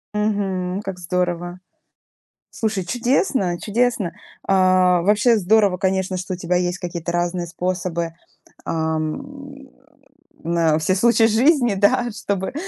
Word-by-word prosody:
Мгм. 195 -3 -1
Как 195 -2 -6
здорово. 175 0 -2 0.9
Слушай, 215 -4 -2
чудесно, 240 - 0
чудесно. 225 -4 0 0.3
А, 185 -2 +3
вообще 210 +4 +3
здорово, 200 -1 +3
конечно, 190 -1 -1
что 180 +1 -4
у - - -5
тебя 180 0 0
есть 180 0 -1
какие-то 170 -1 -4
разные 175 0 -1
способы, 175 -1 -3 0.5
а, 160 -1 -1
м, 275 - -7 0.7
на 165 -2 +2
все 185 +4 +1
случаи 230 +2 +4
жизни, 240 0 +3
да, 205 +5 +2
чтобы 200 0 -3
185 Hz, 120 wpm, -21 LUFS, 175-215 Hz, 0.9 s, случаи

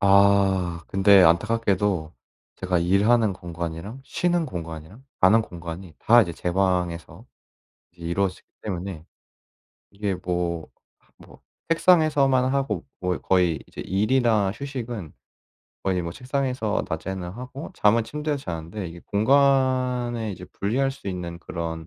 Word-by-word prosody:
아 95 -3 +3
근데 95 0 +6
안타깝게도 100 -2 +2 0.4
제가 90 -2 0
일하는 105 +5 +3
공간이랑 85 +5 -6
쉬는 175 +2 0
공간이랑 85 - -8 0.2
자는 110 +5 +6
공간이 85 -2 -8
다 120 +1 +6
이제 85 -5 -4
제 90 +2 -3
방에서 90 +1 -1 0.7
이제 85 -1 -14
이루어지기 90 +2 -1
때문에 90 -4 -5 0.8
이게 100 -1 -2
뭐 90 -2 -2 0.6
뭐 - - -16 0.3
책상에서만 155 -7 +4
하고 135 +1 -1 0.2
뭐 90 -1 0
거의 90 -4 +2
이제 - - -13
일이나 110 +1 +2
휴식은 120 - -6 0.7
거의 95 -2 0
뭐 85 -1 -4
책상에서 130 -1 -2
낮에는 90 +2 -4
하고 125 - -8
잠은 110 +2 +3
침대에서 150 +2 -3
자는데 90 - -5
이게 85 +1 -11
공간에 125 -1 +2
이제 90 0 -9
분리할 130 +10 -1
수 135 -7 -8
있는 85 -2 -5
그런 80 -2 -5
100 Hz, 285 characters per minute, -24 LUFS, 85-120 Hz, 0.8 s, 근데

